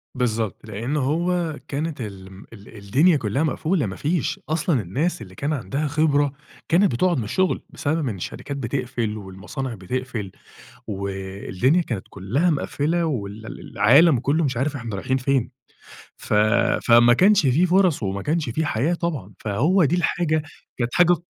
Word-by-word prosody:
بالضبط، 115 -4 -1
لأن 115 +8 -3
هو 165 +3 0
كانت 150 -1 -3
ال 95 -3 -8
م 95 +3 -13
ال 105 +1 -13
الدُنيا 140 - +3
كُلّها 125 +6 -1
مقفولة 155 - 0
ما 95 -2 -5
فيش 160 +1 -1
أصلًا 155 -5 +1
الناس 130 - -2
اللي 95 -3 -11
كان 145 +7 -2
عندها 140 +4 -2
خبرة 145 -1 +2 0.4
كانت 185 +3 +4
بتقعُد 170 +7 +1
من 115 - -1
الشغل، 185 - 0
بسبب 155 0 -1
إن 105 - -4
الشرِكات 140 +9 -6
بتقفل 120 -4 -2
والمصانع 105 +7 -6
بتقفل 110 0 -4 0.6
و 100 -1 -4
الدُنيا 95 - 0
كانت 115 - -5
كُلّها 120 - 0
مقَفلة 155 +2 0
وال 110 -5 -4
ال - - -8
العالم 140 +5 +5
كُلُّه 150 +6 +1
مش 130 -4 -1
عارف 140 +3 -1
إحنا 120 -5 -5
رايحين 130 +7 -1
فين، 130 -2 0 0.7
ف - - -5 0.5
فما 120 0 +7
كانش 200 - +5
في 150 +8 +4
فرص 180 - +3
وما 100 0 -2
كانش 155 - -1
في 160 +7 -1
حياة 145 +8 0
طبعًا، 155 - -3
فهو 150 - +2
دي 155 - +2
الحاجة 160 -3 0 0.3
كانت 120 -1 -2
حاجة 175 0 +6
ق 170 -1 -4
135 Hz, 165 wpm, -23 LUFS, 110-160 Hz, 0.7 s, فما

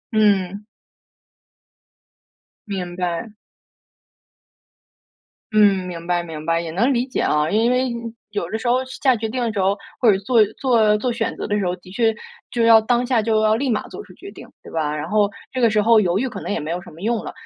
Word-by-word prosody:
嗯。 200 -1 +2 2.0
明 180 -3 -4
白。 180 +4 -3 2.2
嗯， 200 -3 +4
明 170 -2 -7
白， 175 -1 0
明 160 -3 -8
白。 165 0 +2
也 165 -1 -6
能 230 +11 +1
理 245 -1 +1
解 260 - -4
啊， 150 0 +1
因 225 +3 +3
为 250 0 +1 0.4
有 200 -5 -3
的 220 - -2
时 240 - -5
候 250 +2 +2
下 260 0 +1
决 220 0 -3
定 255 +3 -3
的 230 -2 -1
时 205 - -2
候 195 +2 +2 0.2
或 230 - +6
者 190 - +2
做 220 +3 +3 0.2
做 225 -5 +3
做 245 +3 -1
选 235 - -2
择 - - -4
的 210 0 0
时 195 - -1
候， 180 - -1
的 180 0 -16
确 225 +2 +2 0.4
就 235 - 0
要 225 -1 +7
当 240 +2 +1
下 245 -3 +2
就 220 0 +1
要 215 0 +3
立 265 +4 -1
马 220 - -1
做 415 - -9
出 - - -17
决 395 - -11
定， - - -12 0.2
对 - - -12
吧？ 155 -2 -1
然 150 +1 -4
后 210 +2 +2 0.2
这 255 - -3
个 230 - +5
时 215 0 +1
候 225 0 +6
犹 180 -2 +1
豫 255 +6 0
可 250 - -7
能 - - -4
也 - - -1
没 150 +2 -5
有 175 +1 -3
什 - - -13
么 160 - -14
用 230 +2 -1
了。 - - -6
215 Hz, 235 characters per minute, -21 LUFS, 180-235 Hz, 2.2 s, 要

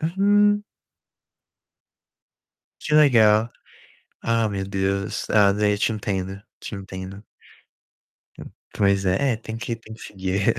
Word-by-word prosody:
Hum. 205 +4 +2 2.2
Que 150 - -2
legal. 115 -7 +5 0.7
Ah, 115 -1 +1
meu 95 -1 -3
Deus! 95 0 -2
Ah, 105 -2 +5
de 105 0 +1
eu - - -2
te 110 - +1
entendo, 95 -2 -4 0.2
te - - -7
entendo. 95 +1 -9 1.1
Hum. - - -10 0.2
Pois 100 -1 +2
é, 95 +9 +1
é - - -2
tem 110 0 -8
que 115 0 -4
tem 110 -1 -12
que 115 - -16
seguir. 95 0 -3
105 Hz, 125 wpm, -23 LUFS, 95-115 Hz, 2.2 s, legal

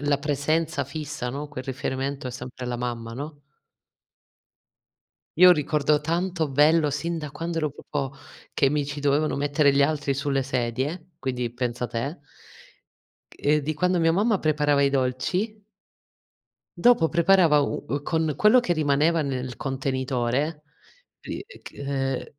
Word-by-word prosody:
la 145 -1 +1
presenza 150 +1 0
fissa, 145 -2 -5
no? 145 +3 -5
Quel 135 -3 -7
riferimento 135 +1 -3
è - - -3
sempre 125 0 -7
la 125 0 -2
mamma, 120 -1 -4
no? 145 +4 -7 2.0
Io 180 0 +9
ricordo 150 -2 +2
tanto 170 +1 -1
bello 150 +3 +4
sin 165 +4 -2
da 150 -3 -6
quando 165 +1 -3
ero 155 -2 0
proprio 140 -1 -4 0.4
che 135 - +2
mi 145 -1 0
ci 145 0 -5
dovevano 145 +2 +1
mettere 145 0 +2
gli 140 - +4
altri 145 -1 0
sulle 135 -1 -1
sedie, 135 +7 -3
quindi 125 -2 -2
pensa 120 -1 -3
te! 135 +7 -4 1.1
Ehm, 150 +1 +1
di 155 +3 -1
quando 180 +3 +1
mia 165 -1 +3
mamma 205 +3 +2
preparava 150 -2 +2
i 140 - +3
dolci 180 - -1 1.1
dopo 175 -5 +5
preparava 170 -3 +4
u 145 - -2
uhm, 145 0 -2
con 160 -1 0
quello 215 +4 +6
che 210 -8 +1
rimaneva 155 +1 +2
nel 130 -2 -3
contenitore, 135 +2 -2 0.6
uhm, - - -5
e - - -15
ch - - -10
ehm, 135 -2 -2
145 Hz, 145 wpm, -25 LUFS, 135-160 Hz, 2.0 s, Io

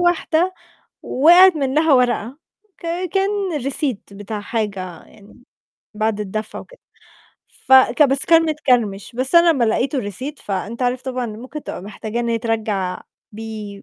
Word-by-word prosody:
واحدة 350 0 +1 0.5
وقعِت 345 +5 +6
منّها 295 +3 +1
ورقة 250 0 0 0.4
ك 340 - -9 0.3
كان 390 -5 0
Receipt 275 -3 -2 0.2
بتاع 205 +1 -6
حاجة 195 -5 -4
يعني 210 +3 -19 0.5
بعد 215 0 -1
الدفع 210 +1 -5
وكده. - - -14 0.9
فك 265 +3 +6
بس 275 -1 +2
كان 330 0 +6
متكرمش، 250 -11 0
بس 260 +5 -2
أنا 340 0 +7
لمّا 260 -6 +1
لقيت 250 +5 0
الReceipt، 255 +6 -5
فأنت 205 +5 -4
عارف 250 +1 -1
طبعًا 255 -2 -3
ممكن 250 +7 -8
تبقى - - -7
محتاجة 215 +3 -5
إن 235 - -2
هي 230 0 0
ترجّع 215 -5 -2 0.3
بيه، 215 -2 -8
245 Hz, 140 wpm, -20 LUFS, 215-300 Hz, 0.9 s, أنا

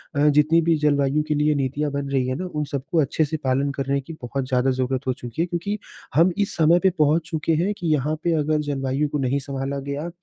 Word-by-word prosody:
अ, 145 +1 +3
जितनी 150 +3 +4
भी 165 0 +2
जलवायु 145 0 +2
के 155 - +1
लिए 150 0 +2
नीतियाँ 140 +2 -1
बन 140 0 -3
रही 135 -2 0
हैं 130 - -1
ना, 185 - -4
उन 150 -4 -3
सबको 140 +4 -1
अच्छे 155 +2 +1
से 155 +2 -3
पालन 135 +2 +1
करने 140 0 -1
की 150 +5 -9
बहुत 130 +2 -3
ज़्यादा 130 0 +2
ज़रूरत 130 +1 -2
हो 130 - +2
चुकी 125 +4 -5
है - - +2
क्योंकि 180 +4 -3 0.4
हम 170 +4 +5
इस 205 -1 -1
समय 165 +2 +5
पे 190 - +6
पहुँच 155 +2 +2
चुके 160 0 0
हैं 205 +3 0
कि 170 - -4
यहाँ 150 +2 0
पे 170 - +2
अगर 150 +1 +1
जलवायु 135 +1 0
को 150 - -2
नहीं 135 +1 0
संभाला 140 0 -4
गया 140 +4 -4
145 Hz, 240 wpm, -23 LUFS, 135-155 Hz, 0.4 s, पे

